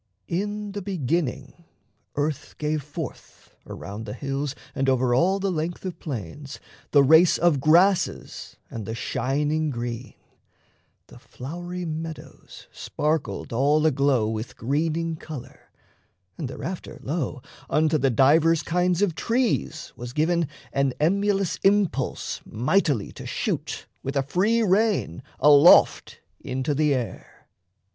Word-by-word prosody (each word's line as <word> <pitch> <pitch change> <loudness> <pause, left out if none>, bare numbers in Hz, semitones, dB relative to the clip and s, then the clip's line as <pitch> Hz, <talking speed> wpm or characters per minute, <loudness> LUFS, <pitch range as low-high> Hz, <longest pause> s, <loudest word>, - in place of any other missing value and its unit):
In 205 +3 -2
the 205 +1 -5
beginning, 165 -4 -2 0.5
earth 145 -1 -2
gave 150 0 -1
forth, 150 +1 -9
around 105 +3 -7
The - - -5
hills 140 +1 -3 0.2
and 135 0 0
over 130 -1 +2
all 185 +10 +3
the 195 0 0
length 170 +2 -3
of 180 -3 -5
plains, 135 - -6 0.3
The 140 -2 +5
race 160 +5 +6
of 170 -4 +3
grasses 175 +7 +2 0.2
and 110 -4 -6
the 115 - -3
shining 150 +7 -1
green; 120 -1 -5 0.9
The - - -15
flowery 175 +6 -7
meadows 160 0 -8
sparkled 150 -5 -2
all 145 +6 +3
aglow 140 -6 +2
With 110 +1 -5
greening 160 +5 -1
colour, 155 -5 -10 0.7
and 150 - -4
thereafter, 170 +7 -6
lo, 145 -3 -3 0.3
Unto 155 0 +2
the 135 +1 +2
divers 155 +6 +4
kinds 180 +3 +1
of 190 -5 +1
trees 225 - -1
was 120 0 -8
given 165 +2 +1 0.3
An 140 -2 +1
emulous 195 +3 +1
impulse 195 -9 0
mightily 130 - 0
to - - -9
shoot, - - -3 0.2
With 135 +2 -4
a 135 - +2
free 205 +11 +2
rein, 200 - +1 0.2
aloft 150 +3 +6 0.2
into 130 +3 -2
the 150 +1 +2
air. 120 -7 -6
155 Hz, 125 wpm, -25 LUFS, 135-175 Hz, 0.9 s, race